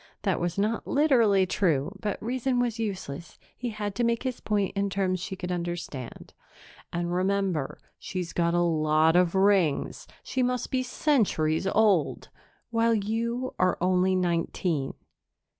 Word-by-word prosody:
That 190 -3 +1
was 175 +1 -2
not 215 +3 0
literally 235 -10 +4
true, 180 -2 0
but 205 0 -3
reason 250 +2 0
was 240 -2 -1
useless; 185 -7 -5 0.2
he 245 - -4
had 210 -2 -4
to 240 - -1
make 235 0 +1
his 255 -2 -3
point 205 -2 -1
in 200 0 0
terms 190 -1 0
she 180 +2 -5
could 180 -1 -5
understand. 175 -8 -5 0.6
"And, 175 0 -2
remember, 185 -5 0 0.2
she's 185 -4 -5
got 170 0 +1
a 175 - +3
lot 155 -1 +3
of 180 0 +3
rings 190 -6 +2 0.2
she 260 - -2
must 250 0 -1
be 260 - +1
centuries 205 - +1
old 200 -7 +2 0.4
while 230 0 +3
you 235 +4 -2
are 185 -1 +2
only 185 +1 +2
nineteen." 170 -4 -1
190 Hz, 145 wpm, -27 LUFS, 175-225 Hz, 0.6 s, literally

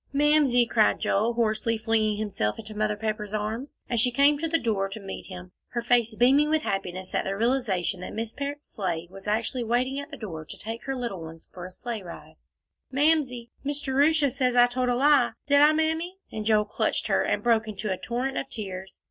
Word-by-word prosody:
"Mamsie!" 285 -4 +4
cried 220 -2 +3
Joel, 220 +4 +1
hoarsely, 230 0 0
flinging 220 -1 +1
himself 200 - -2
into 215 -1 -8
Mother 210 0 0
Pepper's 215 -1 -3
arms, 220 +6 -4
as 240 - 0
she 250 - +4
came 280 +4 +4
to 325 - -1
the 330 +1 +2
door 205 -7 -1
to 200 - -7
meet 195 -2 -7
him, 185 -1 -9 0.2
her 240 - -1
face 235 -2 +2
beaming 275 +6 +4
with 310 0 +2
happiness 185 -1 -3
at - - +1
the 195 - -2
realization 210 -6 0
that - - -7
Miss 225 0 -3
Parrott's 285 +2 -5
sleigh 175 -4 -3 0.2
actually 230 +4 0
was 225 - -7
waiting 255 +3 +1
at 285 - -7
the - - -8
door 165 -8 -6
to - - -10
take 225 +1 -6
her 270 - -2
little 235 -8 -4
ones 160 0 -10
for 180 0 -7
a - - -10
sleigh 230 +3 -5
ride, 175 -3 -11 0.5
"Mamsie! 270 -5 +1
Miss 285 +1 -1
Jerusha 285 +1 +3
says 255 -2 0
I 245 0 +8
told 250 +1 -1
a 245 - +2
lie. 275 -1 +4
Did 285 0 +5
I, 300 +1 +7
Mammy?" 320 +4 -1
and 215 -1 -4
Joel 215 -1 +4
clutched 210 - -1
her - - +2
and - - 0
broke 225 -2 +3
into 210 -1 -4
a - - +1
torrent 255 +5 -3
of 270 - -6
tears. 190 -3 -7
235 Hz, 215 wpm, -26 LUFS, 210-270 Hz, 0.5 s, I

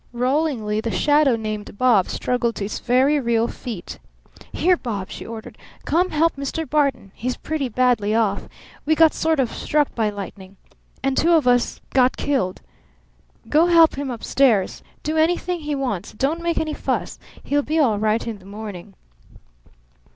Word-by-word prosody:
Rollingly 250 -4 0
the 230 - -3
shadow 290 +1 +3
named 215 -2 -5
"Bob" 230 -7 +4
struggled 240 -2 -1
to 200 - -3
its 205 - -4
very 265 +4 +3
real 235 -2 +1
feet. 230 -9 -7 0.5
"Here, 365 +2 +3
Bob!" 210 - -5
she - - -8
ordered. 225 -1 -9 0.3
"Come 360 +3 +2
help 325 +2 +2
Mr. 280 +3 -3
Barton. 280 -9 0
He's 250 +3 -3
pretty 295 -4 -3
badly 230 -3 +2
off. 210 -3 0 0.3
We 315 +1 +2
got 320 0 +5
sort 320 -2 0
of 250 -4 +1
struck 295 -1 0
by 220 -3 0
lightning. 195 -1 -9 0.5
And 270 0 +1
two 340 +5 +3
of 310 -6 +3
us 245 -1 +2
got 255 -1 +3
killed. 260 -11 -1 0.9
Go 315 +3 +4
help 335 -2 +6
him 280 -1 -4
up 235 -3 -6
stairs. 230 -9 +2 0.2
Do 310 +1 -1
anything 350 +2 +1
he 300 -2 -3
wants. 245 -9 -3
But - - -20
don't 310 +5 0
make 340 0 -1
any 310 -1 -1
fuss. - - -3 0.2
He'll 290 +1 +1
be 310 +3 -2
all 235 -10 +3
right 215 +1 +1
in 225 -3 -5
the 185 - -18
morning." 200 -2 -8
255 Hz, 170 wpm, -22 LUFS, 215-300 Hz, 0.9 s, help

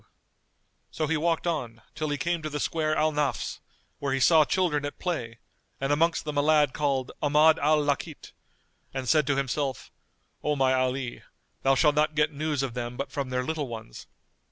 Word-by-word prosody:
[FN#222] - - -32 0.8
So 155 - -2
he 160 +2 0
walked 165 +2 0
on, 120 -10 -3
till 155 -1 -3
he 145 - -1
came 170 +4 -1
to 155 - -4
the 150 0 -4
square 155 -1 0
Al 155 0 +2
Nafz, 145 -4 -2 0.4
where 140 -2 -1
he - - -1
saw 160 +3 +6
children 160 -3 0
at 145 - -5
play, 120 -11 -3 0.4
and 135 +1 +1
amongst 165 +2 +1
them 150 -1 -1
a - - +4
lad 150 -2 +3
called 135 -3 -1
Ahmad 150 +2 +5
al 155 +2 +3
Lakít,[FN#223] 145 +1 -2 0.6
and 130 -1 -3
said 150 +4 +3
to 145 - +2
himself, 135 0 -2 0.5
"O 150 0 +1
my 135 -2 +3
Ali, 130 -1 -1 0.4
thou 135 0 +3
shalt 150 +2 +4
not 155 +1 +1
get 150 0 +2
news 150 -1 -1
of 130 -3 -3
them 120 0 -5
but 140 - -4
from 140 -3 -3
their 125 0 -1
little 155 0 -2
ones." 110 - -9
145 Hz, 195 wpm, -27 LUFS, 135-155 Hz, 0.8 s, saw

